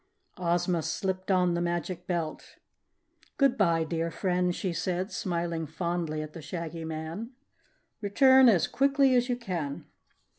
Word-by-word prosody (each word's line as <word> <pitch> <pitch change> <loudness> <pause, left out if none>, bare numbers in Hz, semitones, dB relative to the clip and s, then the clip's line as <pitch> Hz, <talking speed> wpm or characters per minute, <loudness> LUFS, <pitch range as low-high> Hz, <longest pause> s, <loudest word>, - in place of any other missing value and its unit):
Ozma 175 0 +1
slipped 185 +3 -3
on 180 -2 +3
the 170 - -1
Magic 175 +1 -3
Belt. 170 -3 -3 0.8
"Goodbye, 200 - +3
dear 165 +1 -2
friend," 180 0 0
she 185 -4 -2
said, 185 +3 -2
smiling 170 -3 -2
fondly 170 -2 -2
at 155 0 -9
the 165 - -8
Shaggy 165 +1 -5
Man. 160 +9 -5 0.7
"Return 260 +5 +6
as 180 -8 +4
quickly 275 0 +3
as 245 0 +2
you 245 - +1
can." 175 - -4
175 Hz, 135 wpm, -28 LUFS, 165-200 Hz, 0.8 s, Return